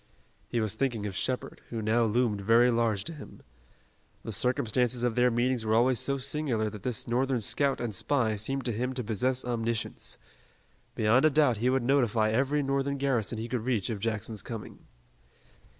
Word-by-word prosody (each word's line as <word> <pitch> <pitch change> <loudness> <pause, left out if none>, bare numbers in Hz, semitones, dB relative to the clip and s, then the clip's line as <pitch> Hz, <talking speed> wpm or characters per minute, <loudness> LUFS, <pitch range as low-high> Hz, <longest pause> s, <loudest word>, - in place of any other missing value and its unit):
He 120 - -1
was 110 -3 0
thinking 120 -6 -1
of 100 -2 -4
Shepard, 130 +6 -3
who 115 - -4
now 110 +2 +2
loomed 110 -2 +1
very 115 +4 +5
large 115 -4 +1
to 165 - -5
him. 150 - -12 0.8
The - - -5
circumstances 125 +1 0
of 120 -2 +1
their 125 +1 +3
meetings 120 0 0
were 110 0 +1
always 120 +1 +3
so 140 +4 +1
singular 125 -6 -1
that 105 - -9
this 120 +1 -2
Northern 130 +2 +1
scout 140 +5 0
and 120 -3 -3
spy 115 +1 +1
seemed 135 +6 -3
to 120 - 0
him 125 +4 -2
to 125 - -3
possess 125 +4 0
omniscience. 115 -2 -2 0.8
Beyond 115 +6 +3
a - - +7
doubt 145 -6 +3
he 120 +4 +1
would 130 -1 +1
notify 120 -5 +2
every 140 +5 +1
Northern 140 +1 -1
garrison 125 -5 0
he 115 +2 -4
could 125 -1 -2
reach 115 -3 -1
of 105 - -4
Jackson's 110 -1 -3
coming. 115 -1 -9
120 Hz, 180 wpm, -29 LUFS, 110-130 Hz, 0.8 s, a